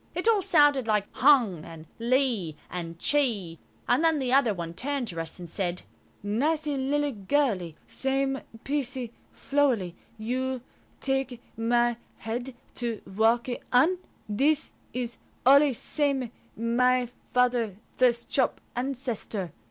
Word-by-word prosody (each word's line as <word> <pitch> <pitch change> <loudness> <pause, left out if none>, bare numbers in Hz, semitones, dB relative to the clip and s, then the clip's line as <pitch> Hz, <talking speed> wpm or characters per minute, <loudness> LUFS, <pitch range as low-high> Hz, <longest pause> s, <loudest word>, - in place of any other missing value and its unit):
It 360 +5 -1
all 440 -3 +5
sounded 290 -8 +4
like 210 -2 +2
"hung" 240 - +4
and 165 -1 -10
"li" 235 - +1 0.2
and 170 -2 -5
"chi," 210 - +1 0.3
and 250 +6 +3
then 325 -1 +4
the 260 -3 0
other 255 -7 +4 0.2
turned 265 +5 -2
to 165 -2 -3
us 165 - -6
and 175 -1 -8
said– 180 +1 -2 0.4
"Nicee 295 +8 0
lilly 285 +2 0
girlee, 200 - 0
same 270 0 -1 0.2
piecee 260 -4 -2 0.2
flowelee, 255 -11 +1 0.2
you 255 +3 -2 0.4
takee 270 -3 -1 0.2
my 240 +1 +2 0.2
head 245 +3 -4 0.2
to 235 -3 -4
walkee 230 +4 +1
on. 320 +9 +4 0.3
This 280 +9 +1 0.2
is 245 -1 -4 0.3
alle 280 +2 +7
samee 270 -1 -1 0.3
my 245 +2 +2 0.2
father 245 -5 +2 0.2
first 240 -2 +2
chop 260 -3 +1 0.2
ancestor. 240 - -3
245 Hz, 120 wpm, -27 LUFS, 220-275 Hz, 0.4 s, alle